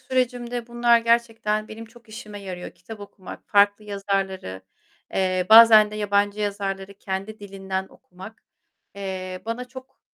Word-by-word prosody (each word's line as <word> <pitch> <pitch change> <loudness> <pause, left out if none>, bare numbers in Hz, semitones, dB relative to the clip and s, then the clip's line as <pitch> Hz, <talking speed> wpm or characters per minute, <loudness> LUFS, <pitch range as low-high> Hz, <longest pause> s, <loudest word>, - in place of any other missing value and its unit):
sürecimde 245 -2 -2
bunlar 240 0 +3
gerçekten 225 -2 0
benim 225 +1 -9
çok 235 0 -19
işime 210 -2 -9
yarıyor. 180 -2 -7
Kitap 205 +5 -12
okumak, 200 -2 -11
farklı 205 +1 +3
yazarları, 195 - -3 0.5
eee, 185 -1 0
bazen 220 -1 +9
de 210 - -7
yabancı 205 0 0
yazarları 200 -1 -3
kendi 195 +3 -5
dilinden 190 -1 -5
okumak, 190 +5 -14 0.5
eee, 185 -2 -6
bana 230 +2 -3
çok, 260 +1 -13
205 Hz, 130 wpm, -23 LUFS, 195-230 Hz, 0.5 s, bazen